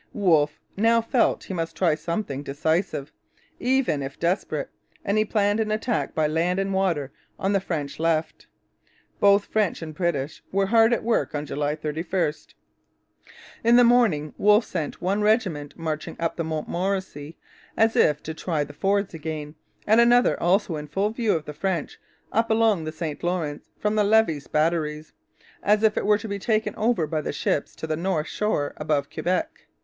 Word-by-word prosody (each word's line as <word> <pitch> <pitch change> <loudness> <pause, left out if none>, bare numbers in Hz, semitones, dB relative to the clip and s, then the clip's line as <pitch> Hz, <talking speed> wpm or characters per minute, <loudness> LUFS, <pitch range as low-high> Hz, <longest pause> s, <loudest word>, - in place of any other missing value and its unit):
Wolfe 155 -7 +2 0.2
now 230 +3 +4
felt 230 +2 +1
he - - -6
must 165 -2 -3
try 170 -3 +3
something 165 -2 -3
decisive, 145 +1 -1 0.5
even 250 - +1
if 135 0 -6
desperate; 175 +4 -1 0.3
and 200 - +1
he 215 - +4
planned 205 0 +1
an 220 -1 0
attack 215 +2 -1
by 155 - +2
land 165 +4 0
and 195 0 -1
water 170 -8 0 0.3
on 195 +1 0
the 195 - +3
French 150 -7 -4
left. 160 -1 -1 0.7
Both 200 0 +5
French 210 -6 0
and 155 -1 -7
British 150 -4 -2
were 195 +1 +2
hard 225 +3 +4
at 235 - +1
work 230 -8 0
on 145 0 -2
July 145 +1 -2
31. 160 +2 -1 1.3
In 235 +1 +5
the 245 - +7
morning 225 -12 +3
Wolfe 210 +2 +5
sent 165 -2 -4
one 195 +3 +1
regiment 195 - 0
marching 155 -2 -4
up 165 0 -1
the 165 - -2
Montmorency, 160 -1 -3 0.4
as 225 0 +3
if 150 -1 +3
to 160 - -5
try 160 -2 -2
the 145 - -10
fords 200 +5 0
again, 155 -2 -5 0.3
and 220 +3 +5
another, 240 +1 +4
also 175 -2 +2
in 150 0 -7
full 200 +6 0
view 225 -2 0
of 160 - -3
the 150 - -7
French, 180 -1 -3 0.3
up 230 +1 +1
along 220 -6 +2
the 155 - -3
St 155 -2 -5
Lawrence 170 -4 -2
from 210 0 0
the 215 -1 +3
Levis 205 -9 +2
batteries, 155 -1 -1 0.5
as 210 +1 +2
if 215 -1 +4
it - - -1
was 210 0 +3
to 220 - -6
be 200 -1 -4
taken 215 0 0
over 220 -6 +1
by 155 0 -2
the - - -3
ships 145 0 -1
to - - -6
the 155 0 -1
north 165 -2 -1
shore 180 -9 -1
above 150 -2 0
Quebec. 185 - -2
175 Hz, 175 wpm, -24 LUFS, 155-210 Hz, 1.3 s, the